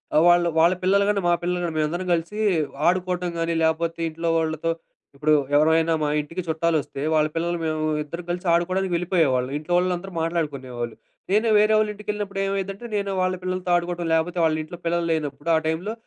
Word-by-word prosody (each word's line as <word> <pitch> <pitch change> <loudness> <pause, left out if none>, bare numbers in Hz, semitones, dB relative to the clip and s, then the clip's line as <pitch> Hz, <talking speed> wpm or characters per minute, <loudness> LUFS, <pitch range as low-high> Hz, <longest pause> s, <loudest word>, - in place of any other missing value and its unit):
ఆ - - +7
వాళ్ళు 175 0 +5
వాళ్ళ 170 +2 +5
పిల్లలుగాని, 200 +1 +2
మా - - +4
పిల్లలుగాని 175 -2 -1
మేమందరం 170 +4 -1
కలిసి 170 +5 -2 0.5
ఆడుకోవటం 180 -1 -1
గాని, 165 0 0
లేపోతే 165 +1 0
ఇంట్లో 165 +1 -3
వాళ్ళతో 160 +1 -1 0.4
ఇప్పుడు 155 +2 +2 0.2
ఎవరమైనా 160 +2 +4
మా 150 - +1
ఇంటికి 165 +5 -6
చుట్టాలొస్తే 160 -3 -1
వాళ్ళ 155 -1 +3
పిల్లలు, 170 +1 -1
మేము 155 0 -1 0.2
ఇద్దరం 170 +4 -7
కలిసి 180 +1 -4
ఆడుకోవడానికి 185 +1 0
వెళ్ళిపోయేవాళ్ళం. 160 -8 +1
ఇంట్లో 155 +4 -4
వాళ్ళందరూ 180 +1 -1
మాట్లాడుకునేవాళ్ళు. 135 -8 -3 0.4
నేను 215 +3 +3
వేరే 215 +1 +4
వాళ్ళ 215 0 +2
ఇంటికెళ్ళినప్పుడు 205 -1 -4
ఏమైద్దంటే, 195 +2 -3
నేను 200 -1 -1
వాళ్ళ 185 0 +1
పిల్లలతో 185 0 -3
ఆడుకోవటం. 175 0 -1
లేపోతే 165 +2 0
వాళ్ళ 155 -1 +2
ఇంట్లో 165 +3 -9
పిల్లలు 170 0 0
లేనప్పుడు, 150 0 -2
ఆ - - +4
టైంలో 175 +7 -2
170 Hz, 165 wpm, -24 LUFS, 160-185 Hz, 0.5 s, ఆ